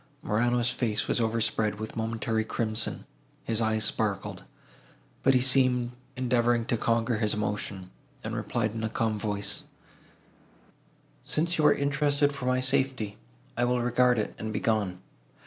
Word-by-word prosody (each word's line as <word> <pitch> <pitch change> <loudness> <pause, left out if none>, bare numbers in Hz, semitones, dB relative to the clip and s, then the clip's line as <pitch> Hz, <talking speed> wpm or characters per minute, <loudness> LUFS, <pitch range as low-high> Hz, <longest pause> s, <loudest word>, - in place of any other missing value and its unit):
Morano's 120 +2 +1
face 110 -4 -1
was - - +1
overspread 110 -2 0
with 110 0 -5
a - - -16
momentary 110 0 -1
crimson, 110 0 -1 0.4
his 115 0 0
eyes 110 -1 +2
sparkled, 100 -4 -1 0.8
but 135 0 +4
he 125 - +4
seemed 125 -2 +3 0.3
endeavouring 120 -2 +2
to 120 - 0
conquer 115 0 +1
his 105 -2 +1
emotion, 100 -3 -3 0.3
and - - -4
replied 110 -3 -1
in 110 -1 -4
a 110 - 0
calm 110 -1 -1
voice, 105 -1 -1 1.6
"Since 170 +2 0
you 150 - +6
are - - +6
interested 145 0 +1
for 125 -3 -5
my 130 0 +2
safety, 130 -5 -1 0.4
I 120 - 0
will 125 0 +1
regard 125 0 +3
it, 105 - -1
and 110 0 -4
be 105 - -1
gone. 100 -5 0
115 Hz, 150 wpm, -28 LUFS, 110-125 Hz, 1.6 s, you